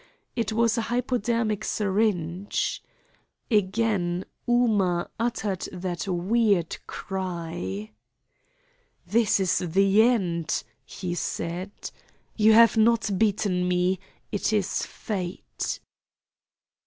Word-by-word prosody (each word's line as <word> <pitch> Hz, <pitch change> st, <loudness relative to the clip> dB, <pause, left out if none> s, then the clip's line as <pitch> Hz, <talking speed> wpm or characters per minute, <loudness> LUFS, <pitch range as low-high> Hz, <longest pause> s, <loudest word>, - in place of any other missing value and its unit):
It 230 Hz, -2 st, -1 dB
was 230 Hz, +1 st, +2 dB
a 225 Hz, -, -3 dB
hypodermic 235 Hz, -3 st, 0 dB
syringe. 195 Hz, -4 st, 0 dB, 0.7 s
Again 190 Hz, -3 st, +1 dB, 0.2 s
Ooma 205 Hz, -8 st, +2 dB
uttered 220 Hz, -5 st, -1 dB
that 180 Hz, 0 st, -4 dB
weird 195 Hz, 0 st, +2 dB
cry. 165 Hz, -, -4 dB, 1.1 s
"This 210 Hz, +3 st, +3 dB
is 190 Hz, -2 st, +2 dB
the 195 Hz, +4 st, +3 dB
end," 185 Hz, -9 st, +1 dB, 0.2 s
he 180 Hz, -2 st, -4 dB
said. 175 Hz, +2 st, -3 dB, 0.6 s
"You 220 Hz, 0 st, +5 dB
have 230 Hz, +1 st, +7 dB
not 225 Hz, -1 st, +3 dB
beaten 200 Hz, -4 st, +1 dB
me. 180 Hz, +1 st, +1 dB, 0.3 s
It 205 Hz, -, 0 dB
is 205 Hz, -4 st, 0 dB
Fate." 185 Hz, -5 st, -4 dB
195 Hz, 90 wpm, -26 LUFS, 180-225 Hz, 1.1 s, have